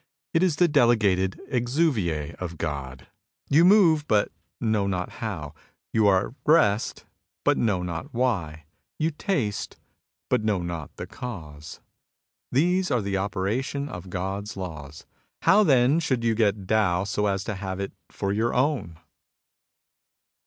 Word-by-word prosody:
It 165 - +3
is 180 -5 +3
the 175 +3 +4
delegated 105 - +3
exuviae 120 - 0
of 85 -2 -5
God. 70 -5 -5 0.5
You 155 +4 +6
move, 175 -6 +5
but 105 -2 +2 0.3
know 110 -3 +1
not 90 -2 -2
how. 85 -11 -4 0.4
You 110 -2 +4
are 95 0 +3
at - - -16
rest, 120 -10 +2 0.4
but - - +3
know 100 -6 0
not 85 -2 -5
why. 90 - -1 0.3
You 160 +1 0
taste, 145 - -2 0.5
but - - +1
know 105 -5 0
not 85 -4 -5
the - - -6
cause. 75 - -8 0.7
These 180 +7 +2
are 125 -6 +1
the 100 0 -1
operation 105 +9 -2
of 90 0 -8
God's 95 +3 -4
laws. 75 -6 -7 0.4
How 210 +2 +6
then 135 -2 +4
should 130 -7 -1
you 115 -1 +2
get 105 -3 +1
Tao 100 -4 +2
so 105 +1 -1
as 100 -1 -1
to 110 - -3
have 95 -1 -5
it 100 - -4 0.2
for 100 0 -2
your 115 +3 0
own 125 - 0
105 Hz, 145 wpm, -25 LUFS, 90-130 Hz, 0.7 s, You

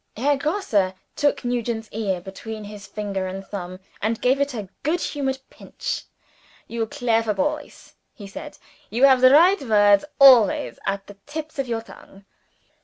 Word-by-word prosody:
Herr 285 +5 +2
Grosse 275 - 0 0.2
took 290 -3 0
Nugent's 235 -2 -2
ear 200 -4 -2
between 215 +4 -8
his 205 -1 -10
finger 200 -2 -3
and 190 +1 -6
thumb, 185 -2 -7 0.2
and 220 +2 -1
gave 265 +3 +2
it 280 -2 -1
a 210 -4 -5
good 320 +5 0
humoured 270 -4 -2
pinch. - - -5 0.6
"You 230 -1 -3
clever 225 -2 0
boys!" 190 - -3 0.2
he 205 - -12
said. 195 - -9 0.3
"You 235 +5 -1
have 265 -2 +6
the 255 - +8
right 350 +8 +6
word 205 -5 +4
always 255 -7 +6
at 195 0 -2
the 205 - -13
tips 310 0 -6
of 270 - -1
your 230 -1 -2
tongue." 195 -3 -16
225 Hz, 160 wpm, -23 LUFS, 200-270 Hz, 0.6 s, the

